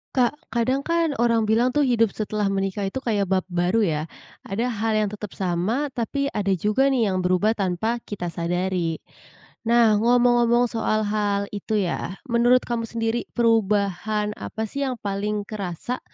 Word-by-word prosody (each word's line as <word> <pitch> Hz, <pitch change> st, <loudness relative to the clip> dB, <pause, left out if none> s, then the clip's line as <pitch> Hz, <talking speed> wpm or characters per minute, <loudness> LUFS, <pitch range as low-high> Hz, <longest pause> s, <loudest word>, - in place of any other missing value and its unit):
Kak, 250 Hz, 0 st, +3 dB, 0.2 s
kadang 255 Hz, +4 st, +1 dB
kan 335 Hz, -1 st, +2 dB
orang 230 Hz, -2 st, +3 dB
bilang 230 Hz, +4 st, +2 dB
tuh 295 Hz, -, +4 dB
hidup 230 Hz, -5 st, +2 dB
setelah 210 Hz, -1 st, -1 dB
menikah 195 Hz, 0 st, -1 dB
itu 195 Hz, -, -3 dB
kayak 205 Hz, -4 st, 0 dB
bab 190 Hz, 0 st, +1 dB
baru 175 Hz, +5 st, +1 dB
ya. 155 Hz, -6 st, 0 dB, 0.5 s
Ada 225 Hz, +6 st, -1 dB
hal 225 Hz, 0 st, -1 dB
yang 210 Hz, -, -1 dB
tetap 210 Hz, -2 st, -8 dB
sama, 195 Hz, +10 st, -1 dB
tapi 275 Hz, +3 st, -2 dB
ada 200 Hz, -2 st, -1 dB
juga 210 Hz, +9 st, +2 dB
nih 240 Hz, -7 st, +2 dB
yang 185 Hz, -, 0 dB
berubah 185 Hz, +4 st, +2 dB
tanpa 200 Hz, +5 st, -1 dB
kita 180 Hz, -4 st, -4 dB
sadari. 175 Hz, 0 st, -1 dB, 0.7 s
Nah, 230 Hz, -3 st, +5 dB
ngomong-ngomong 240 Hz, +1 st, +4 dB
soal 215 Hz, -1 st, 0 dB
hal 205 Hz, -1 st, 0 dB
itu 205 Hz, +1 st, -3 dB
ya, 185 Hz, 0 st, -2 dB, 0.2 s
menurut 240 Hz, +2 st, +4 dB
kamu 230 Hz, -1 st, -3 dB
sendiri 230 Hz, +1 st, -2 dB
perubahan 210 Hz, -2 st, +1 dB
apa 220 Hz, -, -4 dB
sih 280 Hz, 0 st, -2 dB
yang 255 Hz, -, -2 dB
paling 205 Hz, +1 st, -2 dB
kerasa 200 Hz, +3 st, -5 dB
215 Hz, 160 wpm, -24 LUFS, 195-235 Hz, 0.7 s, Nah